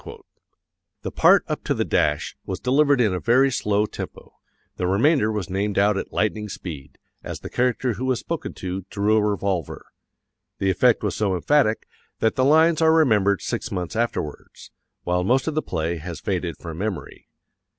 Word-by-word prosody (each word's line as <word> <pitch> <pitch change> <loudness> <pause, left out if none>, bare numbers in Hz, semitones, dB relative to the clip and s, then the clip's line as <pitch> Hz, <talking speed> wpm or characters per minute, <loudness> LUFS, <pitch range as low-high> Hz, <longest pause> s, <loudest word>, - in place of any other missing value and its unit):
The - - -4
part - - +5
up - - -4
to - - 0
the - - -1
dash 75 0 0
was - - -5
delivered 140 +1 +3
in 110 -6 +3
a 90 - -2
very 130 +5 +3
slow 105 -3 +1
tempo, - - -9 0.4
the 90 - -1
remainder 110 - +3
was 105 -4 -3
named 100 +2 -2
out 100 +1 +3
at - - -4
lightning 105 0 -1
speed, 75 -8 -8 0.3
as - - -6
the - - -8
character 125 0 0
who 120 +6 -4
was 130 -2 0
spoken 165 -1 -5
to 95 +1 -5
drew 105 +2 +1
a - - +3
revolver. 100 -5 -2 0.7
The 95 0 +1
effect 120 +5 +3
was 105 -4 -1
so 100 -3 0
emphatic 115 - +1 0.3
that 110 - +1
the 130 - +2
lines 160 +4 +4
are 160 0 +5
remembered 110 - +3
six - - -3
months 90 +4 -4
afterwards, 115 -10 -4 0.3
while 90 +1 0
most 130 - +1
of 160 - 0
the 155 - 0
play 85 - -2
has 80 0 -7
faded 90 -4 -3
from 85 -1 -8
memory. 105 -2 -5
105 Hz, 180 wpm, -23 LUFS, 90-125 Hz, 0.7 s, part